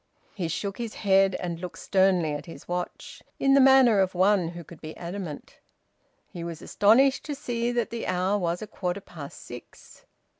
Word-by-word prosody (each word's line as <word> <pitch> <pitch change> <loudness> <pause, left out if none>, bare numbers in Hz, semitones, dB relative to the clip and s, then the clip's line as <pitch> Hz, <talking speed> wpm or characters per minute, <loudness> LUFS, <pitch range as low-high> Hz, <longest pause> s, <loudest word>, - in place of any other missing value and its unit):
He 180 -5 -3
shook 195 +6 -4
his 230 -2 -5
head, 195 -1 +3
and 170 -2 -4
looked 180 -1 -7
sternly 185 -5 +2
at 145 +2 -6
his 165 - -11
watch, 180 0 -5 0.2
in 275 0 +3
the 275 - +6
manner 260 -5 +6
of 190 -1 +1
one 190 -1 +3
who 170 0 -7
could 165 0 -14
be 155 0 -8
adamant. 175 -3 -7 0.7
He 170 - -8
was 170 -2 -6
astonished 260 +7 +3
to 295 - -4
see 240 -3 -2
that 240 -2 -1
the 230 -1 -4
hour 185 +3 +1
was 175 +1 -2
a - - -4
quarter 190 -2 -3
past 155 -7 -11
six. 120 0 -13
190 Hz, 185 wpm, -26 LUFS, 170-215 Hz, 0.7 s, the